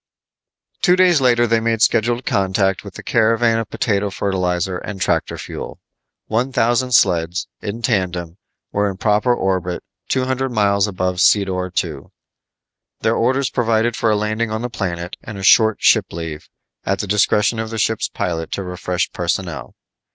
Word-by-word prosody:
Two 180 Hz, -, +5 dB
days 180 Hz, -5 st, +4 dB
later 120 Hz, -2 st, +4 dB
they 115 Hz, -1 st, +2 dB
made 115 Hz, 0 st, +1 dB
scheduled 120 Hz, +2 st, +2 dB
contact 95 Hz, 0 st, +1 dB
with 100 Hz, -3 st, -10 dB
the -, -, -9 dB
caravan 115 Hz, 0 st, +2 dB
of 115 Hz, -, -4 dB
potato 100 Hz, -2 st, 0 dB
fertilizer 90 Hz, -2 st, -1 dB
and 100 Hz, -2 st, -7 dB
tractor -, -, 0 dB
fuel. -, -, -7 dB, 0.5 s
One 120 Hz, +5 st, -1 dB
thousand 125 Hz, 0 st, +1 dB
sleds, 90 Hz, -3 st, +2 dB
in 110 Hz, +3 st, -5 dB
tandem, 90 Hz, -5 st, -1 dB, 0.3 s
were 100 Hz, 0 st, +1 dB
in 95 Hz, -, -6 dB
proper 105 Hz, +4 st, +2 dB
orbit 95 Hz, -6 st, -1 dB, 0.3 s
two 130 Hz, -1 st, +1 dB
hundred 130 Hz, 0 st, -1 dB
miles 100 Hz, -2 st, +2 dB
above 90 Hz, -2 st, -2 dB
Sedor 95 Hz, -2 st, +2 dB
II. 75 Hz, -5 st, -8 dB, 1.0 s
Their -, -, +1 dB
orders 130 Hz, +3 st, +1 dB
provided 115 Hz, -1 st, +1 dB
for 115 Hz, -, +1 dB
a 105 Hz, -, +3 dB
landing 110 Hz, +2 st, -1 dB
on 110 Hz, +2 st, -3 dB
the 125 Hz, -, -4 dB
planet 90 Hz, -4 st, -4 dB
and 105 Hz, -2 st, -8 dB
a 95 Hz, -, -7 dB
short 110 Hz, +2 st, +5 dB
ship -, -, +4 dB
leave, 80 Hz, -2 st, -7 dB, 0.3 s
at 95 Hz, -, 0 dB
the -, -, -3 dB
discretion 105 Hz, +2 st, +2 dB
of 110 Hz, 0 st, -3 dB
the 115 Hz, -, -5 dB
ship's 110 Hz, +1 st, 0 dB
pilot 80 Hz, -2 st, -3 dB
to 100 Hz, -, -3 dB
refresh 90 Hz, 0 st, -2 dB
personnel. 85 Hz, -1 st, -3 dB
105 Hz, 165 wpm, -19 LUFS, 90-115 Hz, 1.0 s, Two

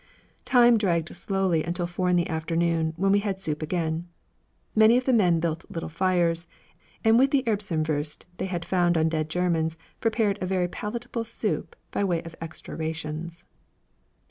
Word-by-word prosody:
Time 240 Hz, -2 st, +6 dB
dragged 170 Hz, -5 st, 0 dB
slowly 190 Hz, -5 st, 0 dB
until 175 Hz, +2 st, -2 dB
four 180 Hz, +1 st, -1 dB
in 180 Hz, -, +3 dB
the 175 Hz, -1 st, +2 dB
afternoon, 165 Hz, 0 st, 0 dB
when 195 Hz, +2 st, +2 dB
we 200 Hz, -, +5 dB
had 200 Hz, -2 st, -2 dB
soup 155 Hz, -5 st, -2 dB
again. 165 Hz, +1 st, -2 dB, 0.7 s
Many 220 Hz, +2 st, +6 dB
of 255 Hz, -, -1 dB
the 260 Hz, -, +3 dB
men 180 Hz, -7 st, +4 dB
built 165 Hz, 0 st, -2 dB
little 165 Hz, -, -5 dB
fires, 170 Hz, -1 st, +1 dB, 0.6 s
and 225 Hz, +1 st, +5 dB
with 270 Hz, +2 st, +5 dB
the 275 Hz, -1 st, +2 dB
Erbsenwurst 160 Hz, -9 st, -1 dB
they -, -, -2 dB
had 175 Hz, -3 st, -3 dB
found 175 Hz, -2 st, +2 dB
on 160 Hz, 0 st, +3 dB
dead 155 Hz, -1 st, -1 dB
Germans 165 Hz, -1 st, 0 dB, 0.2 s
prepared 220 Hz, -3 st, +1 dB
a 185 Hz, -, -1 dB
very 180 Hz, -1 st, +1 dB
palatable 235 Hz, +5 st, -4 dB
soup 225 Hz, -1 st, -3 dB, 0.2 s
by -, -, 0 dB
way 175 Hz, -4 st, 0 dB
of 165 Hz, -1 st, -9 dB
extra 165 Hz, -1 st, -7 dB
rations. 160 Hz, +1 st, -5 dB
175 Hz, 170 wpm, -26 LUFS, 165-205 Hz, 0.7 s, Time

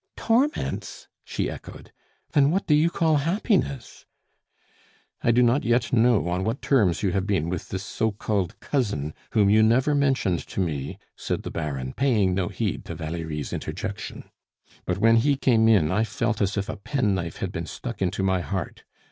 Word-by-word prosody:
"Torments?" 255 Hz, +6 st, -1 dB, 0.2 s
she -, -, -2 dB
echoed. -, -, -9 dB, 0.4 s
"Then 145 Hz, -3 st, +4 dB
what 190 Hz, +5 st, 0 dB
do 150 Hz, -, +3 dB
you 155 Hz, +3 st, +4 dB
call 160 Hz, -2 st, +2 dB
happiness?" 165 Hz, -, -1 dB, 1.2 s
"I -, -, +2 dB
do 120 Hz, +2 st, +5 dB
not 120 Hz, +4 st, +3 dB
yet 120 Hz, -1 st, +1 dB
know 115 Hz, -5 st, +4 dB
on 90 Hz, +2 st, -1 dB
what 115 Hz, +6 st, -1 dB
terms 105 Hz, -, +2 dB
you 95 Hz, -, +2 dB
have 95 Hz, +2 st, -1 dB
been 90 Hz, -6 st, 0 dB
with 90 Hz, -1 st, -4 dB
this 95 Hz, 0 st, -4 dB
so 110 Hz, +2 st, -1 dB
called 100 Hz, -1 st, -2 dB
cousin 100 Hz, -, -1 dB, 0.2 s
whom 105 Hz, -2 st, +4 dB
you 105 Hz, +2 st, +5 dB
never 125 Hz, +7 st, +3 dB
mentioned 135 Hz, -, +1 dB
to -, -, -5 dB
me," 75 Hz, -7 st, -2 dB, 0.2 s
said -, -, -3 dB
the -, -, -5 dB
Baron, 70 Hz, -5 st, -4 dB
paying 110 Hz, -9 st, +2 dB
no 90 Hz, -1 st, 0 dB
heed -, -, -3 dB
to -, -, -6 dB
Valerie's 80 Hz, -1 st, -4 dB
interjection. 100 Hz, +6 st, -5 dB, 0.6 s
"But 90 Hz, -, -1 dB
when 115 Hz, +3 st, +5 dB
he 140 Hz, +5 st, +3 dB
came 115 Hz, -4 st, +3 dB
in 95 Hz, -9 st, +4 dB
I 105 Hz, +4 st, +2 dB
felt 115 Hz, 0 st, -2 dB
as 100 Hz, +1 st, 0 dB
if 100 Hz, -, -1 dB
a -, -, -5 dB
penknife 100 Hz, -, -1 dB
had -, -, -3 dB
been -, -, -5 dB
stuck -, -, -7 dB
into 95 Hz, +1 st, 0 dB
my 95 Hz, -1 st, +2 dB
heart. 95 Hz, -1 st, -4 dB
105 Hz, 180 wpm, -25 LUFS, 90-130 Hz, 1.2 s, do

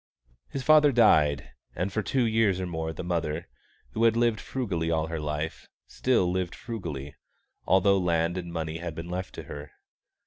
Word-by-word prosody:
His 135 Hz, -, -4 dB
father 150 Hz, +1 st, +6 dB
died; 75 Hz, -, +4 dB, 0.2 s
and 95 Hz, +3 st, -2 dB
for 110 Hz, -, 0 dB
two 130 Hz, +2 st, +1 dB
years 110 Hz, -4 st, +2 dB
or 95 Hz, -, -2 dB
more 80 Hz, -2 st, -3 dB
the 80 Hz, -, -6 dB
mother, 85 Hz, -2 st, -2 dB, 0.4 s
who 110 Hz, -, -1 dB
had 115 Hz, 0 st, +4 dB
lived 115 Hz, -2 st, +2 dB
frugally 95 Hz, -11 st, -2 dB
all 80 Hz, -1 st, +1 dB
her 80 Hz, 0 st, -4 dB
life, 75 Hz, +1 st, -4 dB, 0.2 s
still 115 Hz, -9 st, +1 dB
lived 90 Hz, -1 st, -2 dB
frugally, 75 Hz, -, -6 dB, 0.5 s
although 95 Hz, +2 st, +4 dB
land 85 Hz, -1 st, +1 dB
and 85 Hz, -2 st, -5 dB
money 80 Hz, -1 st, -3 dB
had 85 Hz, -2 st, -5 dB
been 85 Hz, +2 st, -6 dB
left 90 Hz, +1 st, -4 dB
to -, -, -6 dB
her. 75 Hz, +1 st, -9 dB
90 Hz, 175 wpm, -27 LUFS, 80-110 Hz, 0.5 s, father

